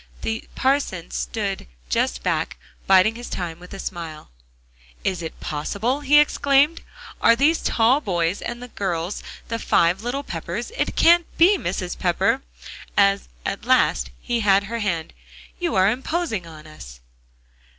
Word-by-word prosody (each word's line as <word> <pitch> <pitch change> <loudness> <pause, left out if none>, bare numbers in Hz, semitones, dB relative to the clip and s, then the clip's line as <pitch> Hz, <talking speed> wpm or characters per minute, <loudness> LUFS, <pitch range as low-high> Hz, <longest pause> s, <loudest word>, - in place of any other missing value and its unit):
The 225 0 -3
parson 260 -11 0
stood 200 -4 -3 0.2
just - - 0
back, - - -1 0.3
biding 190 +3 +6
his 240 +1 -8
time 170 -2 -4
with 180 0 -13
a 195 - -7
smile. 165 - -7 0.7
"Is 185 -3 -1
it 160 - -7
possible?" 200 - -2
he 295 0 +4
exclaimed; 290 +1 +3 0.4
"are 230 - +6
these 295 +7 +3
tall 245 +5 +3
boys 175 - -1
and 240 +1 -5
girls 180 -1 -2 0.3
the 230 0 -2
five 175 -2 +2
little 250 +5 -3
Peppers? 175 - -5
It - - -1
can't 340 0 +5
be, 365 +5 +6
Mrs. 180 - -3
Pepper," 195 +8 +1 0.6
as 200 -1 +3 0.2
at - - -3
last - - +3
he 240 - -1
had 200 -2 +4
her 230 +3 -4
hand. 170 -6 -2 0.5
"You 345 -9 -1
are 190 +2 +5
imposing 260 - -2
on 155 -2 -12
us." 65 - -12
200 Hz, 145 wpm, -23 LUFS, 175-255 Hz, 0.7 s, biding